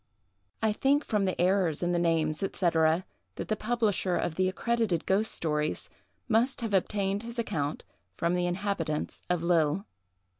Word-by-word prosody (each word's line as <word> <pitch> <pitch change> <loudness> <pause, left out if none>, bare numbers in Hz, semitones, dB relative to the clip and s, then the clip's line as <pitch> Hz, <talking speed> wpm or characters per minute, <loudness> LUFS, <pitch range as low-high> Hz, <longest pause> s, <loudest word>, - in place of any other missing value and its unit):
"I 220 -1 +3
think, 280 +6 +2
from 210 -2 +1
the 185 - -2
errors 180 -3 +2
in 175 - +1
the 175 - +1
names, 160 -2 +1
&c., 195 - 0
that 165 -2 +2 0.3
the 215 - -2
publisher 215 -5 0
of 165 - -1
the 185 +2 +1
'Accredited 220 -3 0
Ghost 200 +3 +2
Stories' 150 -1 -2 0.4
must 240 +3 +2
have 225 -3 -3
obtained 195 +1 +1
his 235 +1 -7
account 150 -10 -2 0.3
from 170 +1 +1
the 180 0 +1
inhabitants 175 -4 -2
of 175 -2 0
Lille." 170 +2 +2
185 Hz, 155 wpm, -29 LUFS, 165-215 Hz, 0.4 s, I